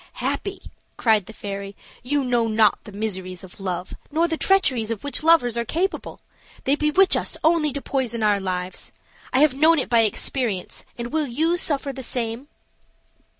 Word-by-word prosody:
"Happy!" 385 -1 -3 0.3
cried 215 -5 +3
the - - -8
fairy; 200 -2 -6 0.3
"you 280 +3 0
know 240 -2 +1
not 215 -1 +3
the 210 - -10
miseries 190 -3 -4
of 185 +1 -13
love 180 -2 -4 0.2
nor 325 +3 +2
the 325 - -1
treacheries 275 - +2
of 230 -3 -4
which 285 - 0
lovers 310 -8 +4
are 235 - 0
capable. 345 - -2 0.4
They 270 - +2
bewitch 300 +6 +4
us - - -2
only 315 -2 +3
to 280 +1 -5
poison 235 -5 -1
our 205 -1 +3
lives; 185 -1 -4 0.4
I 260 - +3
have 300 -3 +5
known 315 +4 +4
it - - -1
by 235 - +4
experience; 220 -2 -1
and 240 +3 -5
will 310 -2 +1
you 315 +8 +1
suffer 285 -5 -1
the 265 - -7
same?" 240 +1 -3
245 Hz, 175 wpm, -23 LUFS, 215-300 Hz, 0.4 s, have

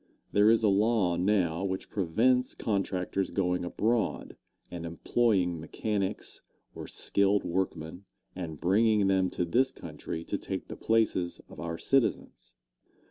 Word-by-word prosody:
There 105 +1 +5
is 115 0 +4
a - - +5
law 100 -3 +2
now 90 -2 +1
which 95 -1 -4
prevents 120 +8 +1
contractors 95 -2 -1
going 90 -2 0
abroad 110 +4 -1 0.4
and 85 -1 -6
employing 90 +1 +1
mechanics 100 +5 -3 0.3
or - - -8
skilled 100 0 +2
workmen, 90 0 -3 0.3
and 80 -5 -6
bringing 105 +3 +3
them 95 -1 +2
to 90 - -2
this 125 +10 +2
country 80 - -7
to - - -3
take - - -4
the - - -6
places 110 -6 +1
of - - -12
our 85 0 -4
citizens. 135 +4 0
95 Hz, 135 wpm, -29 LUFS, 90-110 Hz, 0.4 s, There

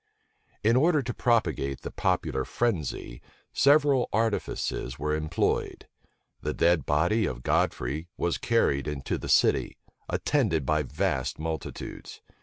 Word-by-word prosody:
[*] - - -39
In 115 +3 +4
order 150 +2 +3
to 120 0 -3
propagate 80 - 0
the - - -6
popular 65 - 0
frenzy, 80 - -2 0.3
several 140 -2 +4
artifices 105 - -1
were 75 +1 -1
employed. 75 0 -1 0.5
The - - -3
dead 85 -4 +2
body 85 +8 +2
of - - -5
Godfrey 70 +7 0
was 85 - -1
carried 75 - +1
into 75 -3 -3
the - - -6
city, - - +3 0.3
attended 80 -4 +1
by 75 +3 +2
vast 70 - -2
multitudes. 80 -1 -6
80 Hz, 125 wpm, -27 LUFS, 70-115 Hz, 0.5 s, In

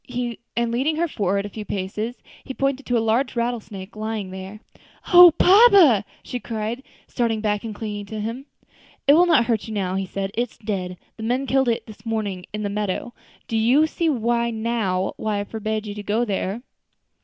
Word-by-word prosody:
And 235 0 +1
leading 270 +7 0
her 340 +2 +1
forward 200 - -1
a - - -5
few 215 +1 -7
paces, 210 +5 -4 0.2
he 265 - -7
pointed 275 0 -1
to 245 - +2
a - - +3
large 245 +5 +1
rattlesnake 225 -5 -4
lying 215 -3 -4
there. 190 +2 -8 0.5
"O 355 0 +11
papa!" 375 - +7 0.2
she 250 - -5
cried, 225 +1 -4 0.2
starting 230 -3 -1
back 210 -1 -1
and 220 -2 -6
clinging 205 -2 -5
to 220 0 -6
him. 230 +6 -5 0.6
"It 280 - +7
will 350 +3 +5
not 295 -9 +4
hurt 225 -3 -1
you 220 - -5
now" 185 -2 -1
he 190 0 -2
said; 195 +1 -4
"it 240 +1 -1
is - - -22
dead; 185 -4 -4 0.2
the - - -9
men 250 +4 0
killed 265 -1 +2
it 230 - -1
this 215 -1 -13
morning 215 -5 -3
in 210 0 -4
the - - 0
meadow. 205 +3 -3 0.3
Do 225 - -3
you 245 +8 +4
see 325 +1 -1
now 230 -6 0
why 215 -2 -1
I - - -1
forbade 215 0 -3
you 205 - -5
to 210 - -6
go 215 +4 0
there?" 200 +2 -3
220 Hz, 195 wpm, -23 LUFS, 205-245 Hz, 0.6 s, O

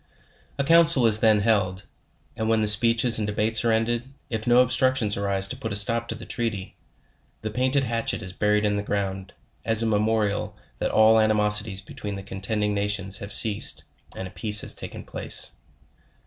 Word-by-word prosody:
A 140 - -1
council 165 -3 +4
is 110 -1 +3
then 110 -2 +2
held; 100 -3 -1 0.5
and 110 0 -3
when 110 -1 +1
the 105 - 0
speeches 115 +2 +3
and 105 - -3
debates 110 +2 +1
are 115 - +1
ended, 120 +3 -2 0.2
if 110 0 -5
no 120 +1 +5
obstructions 130 -4 0
arise 100 -1 -1
to 125 - -5
put 125 -4 -7
a - - -3
stop 115 +3 -1
to - - -5
the - - -11
trea 120 -1 -3
ty, 95 -3 -9 0.7
the 110 - -4
painted 130 +4 0
hatchet 115 -2 -3
is 95 -1 -7
buried 105 +1 0
in 105 0 -1
the - - -2
ground, 95 -2 -5 0.3
as 115 0 +1
a - - -1
memo 110 0 0
rial 100 -1 -4 0.2
that - - -2
all 110 +1 +4
animosities 105 -2 +2
between 100 +1 -8
the 95 - -9
contending 105 +2 -3
nations 100 -1 -1
have 100 - -8
ceased, 105 -1 +5 0.3
and 95 - -7
a - - -13
peace 105 0 +4
taken - - -9
place. - - 0
110 Hz, 190 wpm, -23 LUFS, 100-115 Hz, 0.7 s, no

